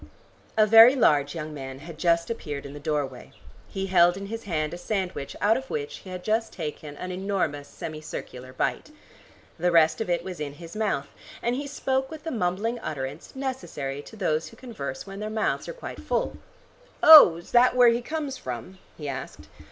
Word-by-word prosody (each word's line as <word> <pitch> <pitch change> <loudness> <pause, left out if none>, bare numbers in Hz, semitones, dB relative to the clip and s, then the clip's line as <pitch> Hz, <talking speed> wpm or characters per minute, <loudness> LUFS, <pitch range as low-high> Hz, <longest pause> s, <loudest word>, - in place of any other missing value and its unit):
A 215 - +6
very 225 +4 +9
large 145 - +3
young 155 -1 -5
man 135 -2 -7
had 155 +2 -11
just 170 +2 +2
appeared 145 -11 -5
in 140 - -8
the 145 - -8
doorway. 140 -4 -3 0.4
He 195 -1 -3
held 175 -1 +4
in 200 - -6
his 225 +3 -6
hand 155 -4 -1
a - - -5
sandwich 185 -8 -3
out 220 +3 +3
of 265 0 -7
which 450 -1 -4
he 190 - -12
had 180 -1 -6
just 220 +1 0
taken 150 -3 -6
an 185 - -5
enormous 180 -7 -2
semi 155 -1 -7
circular 130 -4 -8
bite. 130 - -2 0.7
The 180 +2 +2
rest 160 +1 +4
of 220 - -3
it 175 -1 0
was 185 -2 -7
in 145 -2 -4
his 165 +4 -11
mouth, 205 -10 -1 0.3
and 240 +1 +1
he 285 +2 -4
spoke 265 -2 -1
with 315 -2 -9
the 325 - -4
mumbling 220 +3 -1
utterance 145 - -6
necessary 250 - -4
to 220 - -13
those 165 -6 -1
who 225 - -14
converse 220 - -6
when 195 0 -8
their 215 0 -4
mouths 215 0 -1
are - - -4
quite - - -8
full. - - -1 0.7
"Oh, 305 - +11
is 170 - -11
that 250 +1 +5
where 245 -1 +7
he 235 +1 +1
comes 285 -1 -4
from?" 125 +10 -7 0.2
he 150 - -6
asked. 130 - -7
180 Hz, 200 wpm, -26 LUFS, 150-230 Hz, 0.7 s, Oh